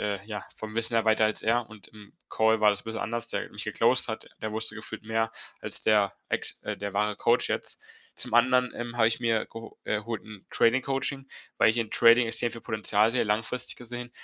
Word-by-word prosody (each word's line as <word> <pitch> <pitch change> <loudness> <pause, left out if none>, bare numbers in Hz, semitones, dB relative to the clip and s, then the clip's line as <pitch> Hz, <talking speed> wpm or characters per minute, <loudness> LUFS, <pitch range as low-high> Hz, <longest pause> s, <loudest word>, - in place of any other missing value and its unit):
äh, 100 -2 -2
ja, 105 -1 -6
vom 110 0 -8
Wissen 115 0 +1
her 115 -1 +2
weiter 110 0 +3
als 110 - -1
er 115 +1 +1
und 105 -1 -13
im 105 -2 -16 0.2
Call 110 0 +3
war 105 - +6
das 100 0 0
bisschen 110 0 -5
anders. 115 +1 -3
Der - - -3
wo - - -23
mich - - -2
geclosed - - +3
hat, - - -5 0.2
der 110 - -3
wusste 110 0 -1
gefühlt 110 0 -7
mehr 110 0 -1 0.3
als - - -2
der 105 -2 +3 0.2
Ex - - 0
äh, - - -3
der 100 -1 -5
wahre 105 +1 +1
Coach 120 +1 +2
jetzt. - - -3 0.4
Zum - - -1
anderen, 125 +1 +4
ähm, 120 0 -6
habe 110 -2 +4
ich 115 - -1
mir 115 -2 +1
geho 115 0 -11
äh, - - 0
geholt 115 +1 -5
'n 105 -3 -12
Trading-Coaching, 135 +2 +1 0.3
weil - - +6
ich 115 - -1
in 115 - -1
Trading 115 +1 +6
extrem 115 +1 +3
viel 115 - -8
Potenzial 110 0 +2
sehe, 125 - +1
langfristig 110 +4 -1
gesehen. 120 0 -7
115 Hz, 225 wpm, -27 LUFS, 110-120 Hz, 0.4 s, war